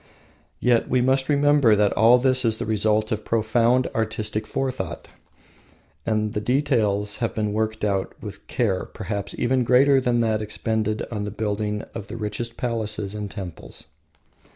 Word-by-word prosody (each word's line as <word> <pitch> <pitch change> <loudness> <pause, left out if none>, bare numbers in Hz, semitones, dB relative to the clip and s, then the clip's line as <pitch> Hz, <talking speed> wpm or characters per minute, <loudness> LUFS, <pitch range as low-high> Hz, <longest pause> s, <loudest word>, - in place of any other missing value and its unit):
Yet 120 -2 +2
we 130 - +2
must 130 +2 +1
remember 145 -5 +4
that 105 -1 +2
all 115 +4 +6
this 130 0 +3
is 110 -2 +2
the - - -3
result 110 0 +1
of 110 -1 -2
profound 115 +3 +2
artistic 110 -1 -2
forethought, 125 -11 -4 1.0
and 110 -1 0
that - - -1
the - - -8
details 110 -6 +1
have 115 - -2
been 105 -1 -1
worked 110 0 -1
out 100 -2 -1
with - - -10
care - - 0
perhaps 100 -2 -5
even 130 +1 +1
greater 135 +3 +5
than 120 -1 +1
that 110 -2 +1
expended 110 0 -1
on 105 -3 -3
the 105 - -3
building 105 0 -2
of 110 -2 -7
the 115 - -7
richest 115 +2 -5
palaces 110 -4 -2
and 105 -1 -5
temples. 95 -5 -8
110 Hz, 160 wpm, -23 LUFS, 105-125 Hz, 1.0 s, all